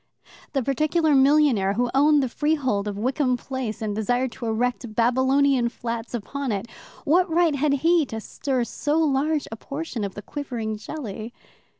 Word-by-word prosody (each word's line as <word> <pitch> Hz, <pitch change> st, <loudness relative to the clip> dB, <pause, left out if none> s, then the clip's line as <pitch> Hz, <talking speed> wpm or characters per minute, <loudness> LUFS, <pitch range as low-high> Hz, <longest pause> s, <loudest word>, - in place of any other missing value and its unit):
The 270 Hz, -3 st, 0 dB
particular 305 Hz, +4 st, +1 dB
millionaire 270 Hz, -8 st, +4 dB
who 240 Hz, +3 st, 0 dB
owned 290 Hz, +1 st, +4 dB
the -, -, 0 dB
freehold 260 Hz, -7 st, 0 dB
of 205 Hz, -1 st, -4 dB
Wickham 255 Hz, +3 st, +1 dB
Place, 245 Hz, -4 st, -5 dB
and 210 Hz, -1 st, -2 dB
desired 245 Hz, +4 st, 0 dB
to 230 Hz, -, -6 dB
erect 235 Hz, 0 st, -1 dB
Babylonian 260 Hz, +2 st, +3 dB
flats 235 Hz, 0 st, -5 dB
upon 270 Hz, +4 st, -4 dB
it 200 Hz, +1 st, -2 dB, 0.4 s
what 355 Hz, +5 st, +3 dB
right 335 Hz, -1 st, +3 dB
had 280 Hz, +1 st, +1 dB
he 340 Hz, -1 st, +5 dB
to 225 Hz, -, -5 dB
stir 255 Hz, +3 st, -2 dB
so 295 Hz, +5 st, -1 dB
large 300 Hz, -1 st, +1 dB
a -, -, -4 dB
portion 275 Hz, -3 st, -5 dB
of 200 Hz, -2 st, -4 dB
the 205 Hz, -, -7 dB
quivering 240 Hz, -6 st, -4 dB
jelly? 220 Hz, -2 st, -7 dB
260 Hz, 165 wpm, -24 LUFS, 225-290 Hz, 0.4 s, he